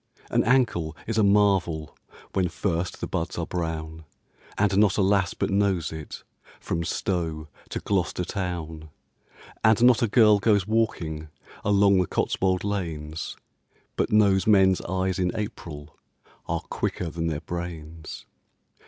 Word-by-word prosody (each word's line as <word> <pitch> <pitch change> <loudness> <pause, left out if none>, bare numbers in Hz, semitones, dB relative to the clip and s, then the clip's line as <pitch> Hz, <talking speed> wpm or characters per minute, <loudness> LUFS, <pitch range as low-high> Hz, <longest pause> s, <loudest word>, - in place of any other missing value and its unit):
An - - +3
ankle 110 - +1
is 110 0 -1
a - - +4
marvel 95 -6 +2 0.4
When 90 -2 +1
first 90 -1 -2
the - - -2
buds 85 +1 -3
are 85 - -1
brown, 80 -2 -4 0.5
And 100 -1 +2
not 105 -3 +4
a 100 - +3
lass 95 -2 +2
but - - -1
knows 100 -4 +1
it 80 -1 -8 0.4
From 85 - -2
Stow 80 -3 -2 0.2
to - - -3
Gloucester 90 -2 -1
town. 85 -5 -4 0.7
And 110 +1 +4
not 125 0 +6
a 115 - +3
girl 105 -1 +5
goes 100 -2 +3
walking 85 -8 -1 0.4
Along 100 -1 +4
the 90 - +1
Cotswold 95 -1 0
lanes 80 -6 -4 0.6
But - - 0
knows 100 -2 +4
men's 95 -3 +5
eyes 95 +1 -1
in 90 -1 +1
April 80 -8 -6 0.5
Are - - -1
quicker 85 -3 -3
than 85 +1 -2
their 75 -2 -2
brains. 80 -2 -7
90 Hz, 140 wpm, -25 LUFS, 80-100 Hz, 0.7 s, not